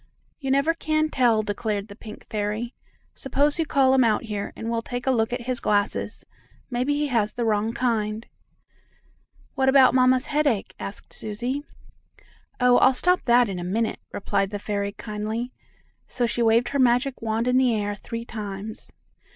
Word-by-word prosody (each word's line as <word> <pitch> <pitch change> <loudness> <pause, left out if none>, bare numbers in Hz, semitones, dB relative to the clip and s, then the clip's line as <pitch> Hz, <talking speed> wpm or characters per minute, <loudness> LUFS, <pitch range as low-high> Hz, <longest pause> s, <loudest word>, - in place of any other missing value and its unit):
"You 270 -3 -4
never 280 +4 +3
can 310 -1 0
tell," 235 -6 +3
declared 205 0 -2
the 200 - -11
pink 215 -1 -11
fairy. 215 +3 -3 0.4
"Suppose 285 +3 +1
you 325 - 0
call 265 -2 +4
him 265 -1 +5
out 220 -1 +2
here, 210 -3 -4
and 225 - -6
we'll 230 0 -1
take 245 +1 -5
a 265 - +3
look 225 -2 +1
at 245 0 -2
his 250 0 -2
glasses. 205 -1 -1 0.5
Maybe 250 +4 0
he 295 0 0
has 215 -4 +1
the 240 -1 -1
wrong 215 0 +1
kind." 225 -2 -1 1.3
"What 265 -1 +2
about 265 -1 +6
mamma's 255 +1 +4
headache?" 290 -9 0
asked 200 - -7
Susie. 240 +6 -3 1.0
"Oh! 250 -1 +5
I'll 260 - +5
stop 360 +6 +3
that 240 0 +5
in 190 -3 -4
a - - -4
minute," 220 +5 -1
replied 195 -1 -1
the 205 - -4
fairy 200 0 -3
kindly, 215 +3 -4 0.6
so 245 - -1
she 235 +1 -1
waved 230 +1 +3
her 280 - -1
magic 250 +1 +2
wand 225 +1 -1
in 250 0 +3
the 250 -3 +3
air 205 -1 -1
three 230 +3 -6
times. 210 -1 -7
235 Hz, 175 wpm, -24 LUFS, 215-260 Hz, 1.3 s, about